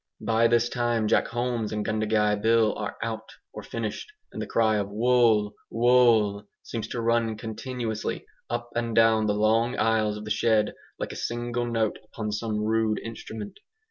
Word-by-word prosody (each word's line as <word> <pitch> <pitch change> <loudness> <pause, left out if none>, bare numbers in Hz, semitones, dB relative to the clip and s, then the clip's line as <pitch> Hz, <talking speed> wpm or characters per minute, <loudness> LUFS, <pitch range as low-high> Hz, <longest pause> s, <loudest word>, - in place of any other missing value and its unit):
By 115 +1 +4
this 120 0 +3
time 120 -2 0
Jack - - +3
Holmes 120 -2 -2
and 105 -1 -2
Gundagai 105 -1 +1
Bill 110 -1 +3
are - - -5
'out,' 110 -1 -5 0.2
or - - -7
finished; 115 - -5 0.2
and - - -5
the - - -4
cry 110 -2 +2
of 100 -1 -2
"Wool!' 110 -1 +3 0.2
Wool!" 115 -4 +3 0.2
seems 110 -2 -5
to 120 - -4
run 115 -1 +1
continuously 110 0 -4 0.2
up 120 0 -3
and 115 -1 -1
down 110 -1 +4
the 105 - +1
long 115 +4 +2
aisles 110 -2 +1
of 105 - -8
the 105 - -5
shed, 105 0 +2 0.2
like - - -4
a - - -7
single 120 0 -2
note 115 -2 0
upon 110 0 -5
some 105 0 -2
rude 110 0 +1
instrument. 110 -2 -8
110 Hz, 170 wpm, -26 LUFS, 105-115 Hz, 0.2 s, By